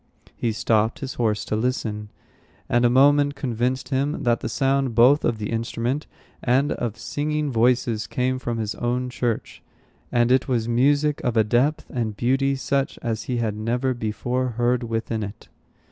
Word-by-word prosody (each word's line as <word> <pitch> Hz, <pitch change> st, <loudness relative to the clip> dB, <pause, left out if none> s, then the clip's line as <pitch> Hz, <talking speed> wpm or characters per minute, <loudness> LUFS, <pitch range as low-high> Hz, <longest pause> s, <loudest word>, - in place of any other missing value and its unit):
He 115 Hz, -, -1 dB
stopped 110 Hz, 0 st, +1 dB
his 135 Hz, -2 st, -5 dB
horse 110 Hz, -3 st, 0 dB
to -, -, -2 dB
listen, 110 Hz, -3 st, -2 dB, 0.6 s
and 120 Hz, 0 st, +2 dB
a -, -, +5 dB
moment 145 Hz, +3 st, +4 dB
convinced 130 Hz, -1 st, -2 dB
him 140 Hz, +3 st, -1 dB
that 120 Hz, -1 st, +2 dB
the -, -, -4 dB
sound 135 Hz, -3 st, +1 dB
both 130 Hz, +6 st, +6 dB
of 115 Hz, -, +1 dB
the 105 Hz, 0 st, -4 dB
instrument 115 Hz, +5 st, -2 dB, 0.3 s
and 135 Hz, +4 st, +2 dB
of 120 Hz, -2 st, -3 dB
singing 150 Hz, 0 st, -2 dB
voices 120 Hz, -2 st, +1 dB
came 130 Hz, +1 st, -1 dB
from 120 Hz, -2 st, -3 dB
his 110 Hz, -1 st, -2 dB
own 125 Hz, +3 st, -2 dB
church; 120 Hz, -3 st, -3 dB, 0.5 s
and 120 Hz, 0 st, +3 dB
it 130 Hz, 0 st, +3 dB
was 120 Hz, -4 st, 0 dB
music 145 Hz, +5 st, +2 dB
of 120 Hz, -2 st, 0 dB
a 110 Hz, -, +6 dB
depth 125 Hz, +8 st, +1 dB
and 110 Hz, -5 st, -2 dB
beauty 135 Hz, +3 st, +1 dB
such 135 Hz, +1 st, -1 dB
as 115 Hz, -2 st, -2 dB
he 125 Hz, -, -2 dB
had 110 Hz, -3 st, -1 dB
never 120 Hz, +4 st, -1 dB
before 120 Hz, +3 st, -2 dB
heard 120 Hz, +1 st, +2 dB
within 115 Hz, -1 st, -2 dB
it. 100 Hz, +1 st, -8 dB
120 Hz, 170 wpm, -23 LUFS, 115-135 Hz, 0.6 s, both